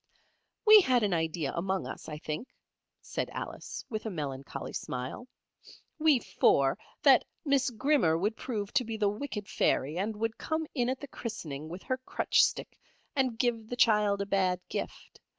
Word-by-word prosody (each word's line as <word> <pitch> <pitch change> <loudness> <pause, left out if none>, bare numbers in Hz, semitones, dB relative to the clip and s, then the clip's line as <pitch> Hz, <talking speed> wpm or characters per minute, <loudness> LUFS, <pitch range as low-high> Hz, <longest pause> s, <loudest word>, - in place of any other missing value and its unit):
"We 430 -1 +10
had 255 - +3
an 200 -3 +1
idea 160 -3 -1
among 190 +2 -1
us, - - -7
I 150 - -5
think," 155 +10 -5 0.5
said - - -3
Alice, - - -6
with 220 -1 -4
a - - -1
melancholy 140 -7 -5
smile, 130 - -5 0.7
"we 310 -3 +5
four, 135 - +3 0.3
that - - +7 0.2
Miss 275 -2 +3
Grimmer 240 - +2
would 205 +6 0
prove 210 -5 -4
to 255 - +3
be 225 -1 -4
the 210 -2 +2
wicked 210 -1 -5
fairy, 150 +6 +1
and 215 +3 -1
would 225 +1 -2
come 315 0 -1
in 245 -2 +1
at 260 0 -2
the 285 - -6
christening 155 - -6
with 180 +3 -8
her 255 - -1
crutch 255 - +2
stick, - - -2 0.4
and 260 -4 +1
give 230 -3 0
the 245 - -3
child 210 -4 +3
a - - -1
bad 190 -2 +1
gift? - - -6
210 Hz, 170 wpm, -30 LUFS, 170-250 Hz, 0.7 s, We